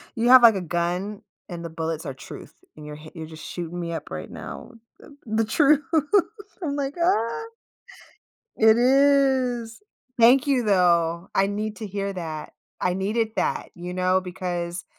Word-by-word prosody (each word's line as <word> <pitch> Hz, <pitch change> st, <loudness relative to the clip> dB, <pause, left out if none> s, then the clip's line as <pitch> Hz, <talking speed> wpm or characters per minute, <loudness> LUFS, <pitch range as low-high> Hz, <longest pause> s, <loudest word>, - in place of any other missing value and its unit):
You 235 Hz, +1 st, +1 dB
have, 255 Hz, -1 st, +9 dB
like, 225 Hz, -3 st, +8 dB
a 190 Hz, -, -2 dB
gun 180 Hz, +4 st, -2 dB, 0.3 s
and 170 Hz, -2 st, -7 dB
the 170 Hz, -, -5 dB
bullets 160 Hz, 0 st, -4 dB
are 140 Hz, -, -4 dB
truth -, -, -11 dB, 0.2 s
and 150 Hz, -1 st, -11 dB
you're 150 Hz, -, -7 dB
hi 155 Hz, +1 st, -12 dB
you're 160 Hz, -3 st, -8 dB
just 160 Hz, 0 st, -11 dB
shooting 175 Hz, 0 st, -6 dB
me 170 Hz, -1 st, -4 dB
up 165 Hz, -, -6 dB
right -, -, -7 dB
now -, -, -9 dB, 0.3 s
the 285 Hz, -, -16 dB
the 220 Hz, +1 st, +1 dB
truth 285 Hz, +6 st, +4 dB, 0.8 s
I'm 285 Hz, -3 st, -2 dB
like, 280 Hz, 0 st, -3 dB
"Ah." 230 Hz, -, +1 dB, 1.1 s
It 220 Hz, +1 st, +5 dB
is. 260 Hz, -3 st, +2 dB, 0.4 s
Thank 250 Hz, +5 st, +6 dB
you 270 Hz, -3 st, +2 dB
though. 175 Hz, -3 st, +2 dB
I 195 Hz, -, +3 dB
need 210 Hz, +1 st, -3 dB
to 220 Hz, -, -6 dB
hear 200 Hz, 0 st, -3 dB
that. 160 Hz, -4 st, -6 dB, 0.3 s
I 180 Hz, -, 0 dB
needed 215 Hz, +4 st, 0 dB
that, -, -, -1 dB
you 175 Hz, +1 st, -7 dB
know, 185 Hz, +1 st, +1 dB
because 175 Hz, -1 st, -4 dB
195 Hz, 170 wpm, -24 LUFS, 170-235 Hz, 1.1 s, have